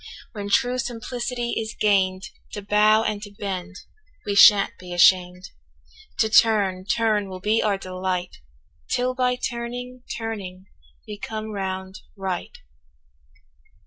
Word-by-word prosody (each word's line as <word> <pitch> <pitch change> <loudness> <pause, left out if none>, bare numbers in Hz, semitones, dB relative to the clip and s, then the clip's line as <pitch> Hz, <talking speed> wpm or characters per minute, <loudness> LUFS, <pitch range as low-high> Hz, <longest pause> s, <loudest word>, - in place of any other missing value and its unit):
When 205 -2 -6
true 250 +4 +2
simplicity 240 0 -3
is 220 0 -6
gain'd, 190 -2 +2 0.3
To 205 - -6
bow 210 +2 +4
and 210 -2 -2
to 205 - -8
bend 195 -2 -5 0.5
we 205 - -1
shan't 200 0 +7
be 180 -1 -10
asham'd, 180 +1 +3 0.7
To 220 - +3
turn, 205 -5 +3
turn 210 -2 +1
will 185 -1 -7
be 215 +4 +1
our 205 -2 +1
delight 185 -1 -4 0.5
'Till 250 0 0
by 250 -1 +1
turning, 245 +1 -5 0.2
turning 200 -5 -6 0.4
we 205 - -7
come 220 0 -5
round 190 -1 -5 0.2
right. 190 -2 -4
205 Hz, 125 wpm, -23 LUFS, 190-225 Hz, 0.7 s, shan't